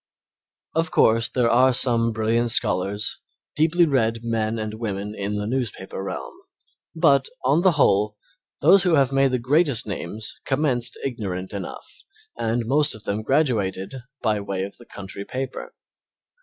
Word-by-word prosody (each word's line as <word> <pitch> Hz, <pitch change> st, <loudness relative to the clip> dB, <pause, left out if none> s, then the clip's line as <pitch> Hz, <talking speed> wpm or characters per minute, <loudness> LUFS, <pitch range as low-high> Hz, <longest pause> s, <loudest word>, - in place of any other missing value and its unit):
Of 165 Hz, 0 st, 0 dB
course, 115 Hz, +1 st, +3 dB
there 125 Hz, -2 st, +1 dB
are 125 Hz, +2 st, +4 dB
some 115 Hz, -2 st, +3 dB
brilliant 115 Hz, +2 st, 0 dB
scholars, 105 Hz, -2 st, +1 dB, 0.4 s
deeply 165 Hz, +3 st, +3 dB
read 115 Hz, -6 st, 0 dB
men 115 Hz, -1 st, -1 dB
and 110 Hz, -1 st, -4 dB
women 105 Hz, -2 st, -4 dB
in 100 Hz, 0 st, -3 dB
the 105 Hz, 0 st, -2 dB
newspaper 110 Hz, -6 st, -3 dB
realm, 65 Hz, -10 st, -6 dB, 0.6 s
but, 140 Hz, -5 st, +3 dB, 0.2 s
on 140 Hz, +6 st, +3 dB
the 185 Hz, -1 st, +4 dB
whole, 105 Hz, -7 st, +2 dB, 0.4 s
those 185 Hz, +7 st, +6 dB
who 175 Hz, -3 st, +3 dB
have 135 Hz, -2 st, +3 dB
made 135 Hz, 0 st, +3 dB
the 130 Hz, -, 0 dB
greatest 135 Hz, +1 st, +2 dB
names 105 Hz, +1 st, -6 dB
commenced 130 Hz, -4 st, 0 dB
ignorant 95 Hz, -8 st, -4 dB
enough 100 Hz, -3 st, -6 dB, 0.5 s
and 115 Hz, 0 st, -1 dB
most 145 Hz, +4 st, +1 dB
of 105 Hz, -, -13 dB
them 100 Hz, +2 st, -2 dB
graduated 110 Hz, -7 st, 0 dB, 0.3 s
by 105 Hz, -3 st, +1 dB
way 100 Hz, -1 st, -3 dB
of 100 Hz, -, -7 dB
the 120 Hz, -, -16 dB
country 100 Hz, 0 st, -7 dB
paper. 130 Hz, +5 st, -6 dB
115 Hz, 150 wpm, -23 LUFS, 105-135 Hz, 0.6 s, those